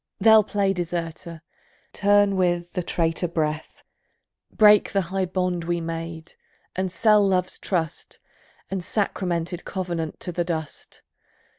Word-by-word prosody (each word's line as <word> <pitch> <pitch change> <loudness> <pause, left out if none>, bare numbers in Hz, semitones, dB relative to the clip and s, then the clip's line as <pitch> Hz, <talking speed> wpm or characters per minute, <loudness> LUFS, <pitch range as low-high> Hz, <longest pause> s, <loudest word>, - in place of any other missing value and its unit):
They'll 220 +1 +7
play 200 -1 0
deserter, 170 -2 -5 0.5
turn 205 -1 +3
with 175 -2 0
the 180 - -1
traitor 165 0 0
breath, 155 -2 -3 0.7
Break 210 -2 +5
the 195 - +3
high 190 -1 +1
bond 180 -1 -1
we 175 0 -1
made, 165 0 -6 0.4
and 185 0 -1
sell 210 +3 +4
Love's 185 -2 0
trust 165 -4 -3 0.5
And 195 -1 -2
sacramented 175 -4 -2
covenant 175 -5 -4
to 180 - -4
the 175 0 -1
dust. 160 -3 -6
175 Hz, 125 wpm, -24 LUFS, 165-195 Hz, 0.7 s, They'll